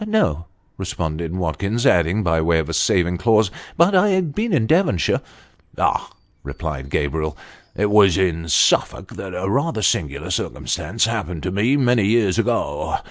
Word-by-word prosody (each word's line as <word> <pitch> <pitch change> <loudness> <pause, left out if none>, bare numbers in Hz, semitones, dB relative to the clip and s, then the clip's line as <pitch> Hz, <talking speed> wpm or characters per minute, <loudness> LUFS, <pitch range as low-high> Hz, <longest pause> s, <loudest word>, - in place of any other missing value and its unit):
" - - -3
No," 85 - 0 0.3
responded 85 -2 -4
Watkins, 95 +7 -2
adding, 90 +4 +3
by 80 -3 +1
way 85 +1 +2
of 80 -1 -2
a - - -3
saving 90 +2 +1
clause, 110 -2 +3
" - - -20
but 170 +4 +4
I've 185 -4 +2
been 225 +5 -2
in 135 -10 +2
Devonshire." 160 - +1 0.3
" - - -32
Ah! - - 0 0.2
" - - -41
replied 70 -4 -6
Gabriel, 75 +2 -2 0.2
" - - -31
it 105 0 0
was 100 -4 +5
in 85 -3 -1
Suffolk 75 - +2
that 95 -2 -7
a 90 +2 -3
rather 135 +1 -1
singular 75 0 -1
circumstance - - -2
happened 85 -3 -4
to 95 - -2
me 110 +9 +1
many 120 -6 +2
years 105 -4 +2
ago. - - -1
95 Hz, 175 wpm, -20 LUFS, 80-120 Hz, 0.3 s, was